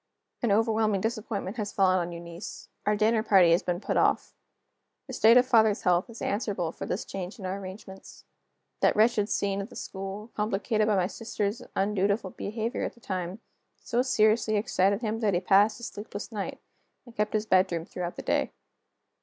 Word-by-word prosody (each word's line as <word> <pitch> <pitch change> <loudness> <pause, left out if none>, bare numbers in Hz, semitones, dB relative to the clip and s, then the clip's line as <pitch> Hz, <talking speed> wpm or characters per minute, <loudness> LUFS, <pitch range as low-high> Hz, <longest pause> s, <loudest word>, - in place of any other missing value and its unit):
An 235 - +1
overwhelming 215 -1 +2
disappointment 215 -1 -3
has 210 -2 -3
fallen 185 -1 +3
on 175 0 -3
Eunice. 170 +2 -8 0.2
Our 210 - +3
dinner 220 +1 +2
party 190 -6 +5
has 170 - +4
been 175 -1 -2
put - - -2
off. - - +2 0.7
The - - -9
state 230 +2 +6
of 250 - +6
father's 220 -4 +3
health 180 +2 +2
is 230 - -8
answerable 200 -5 -1
for - - -7
this 195 - -3
change 190 0 -6
in 195 - -8
our 190 +2 -3
arrangements. 190 0 -10 0.5
That - - +3
wretched 215 -1 +3
scene 200 0 0
at 200 - -7
the - - -13
school, 195 +3 -6
complicated 215 +1 0
by 215 - +3
my 185 -2 +2
sister's 210 +1 -3
undutiful 200 0 0
behavior 220 +3 -3
at - - -4
the - - -19
time, 185 0 -4 0.4
so 240 +1 0
seriously 220 -3 +2
excited 200 -1 +1
him 220 0 -1
that 210 -5 +1
he - - +3
passed 200 +4 +4
a - - -12
sleepless 205 0 -7
night, 205 -3 -4 0.5
and 240 -2 -15
kept 210 0 -1
his 215 0 0
bedroom 185 -4 +2
throughout 175 -1 -5
the - - -7
day. - - 0
205 Hz, 185 wpm, -28 LUFS, 190-220 Hz, 0.7 s, state